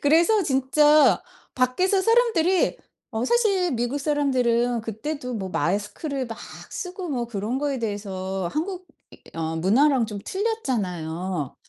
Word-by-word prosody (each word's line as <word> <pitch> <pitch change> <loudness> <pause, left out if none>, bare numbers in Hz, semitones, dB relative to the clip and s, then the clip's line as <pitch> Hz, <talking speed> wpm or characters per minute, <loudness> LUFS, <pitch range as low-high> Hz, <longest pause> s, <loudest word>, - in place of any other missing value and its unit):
그래서 340 +8 +4
진짜 270 - +4 0.3
밖에서 365 +11 +2
사람들이 445 -6 +3 0.3
어 225 +1 -2
사실 395 - +2
미국사람들은 245 -2 +1
그 220 -1 -7
때도 280 -4 -4
뭐 190 -3 -4
마스크를 210 - -2
막 225 - -7 0.3
쓰고 360 -1 -5
뭐 245 -4 -2
그런 225 +3 -3
거에 280 -2 -1
대해서 195 -4 -3
한국 365 +3 -3
이 - - -21 0.2
어 160 0 -2
문화랑 240 - +3
좀 210 -2 -6
틀렸잖아요. 185 - -2
255 Hz, 270 characters per minute, -24 LUFS, 210-320 Hz, 0.3 s, 그래서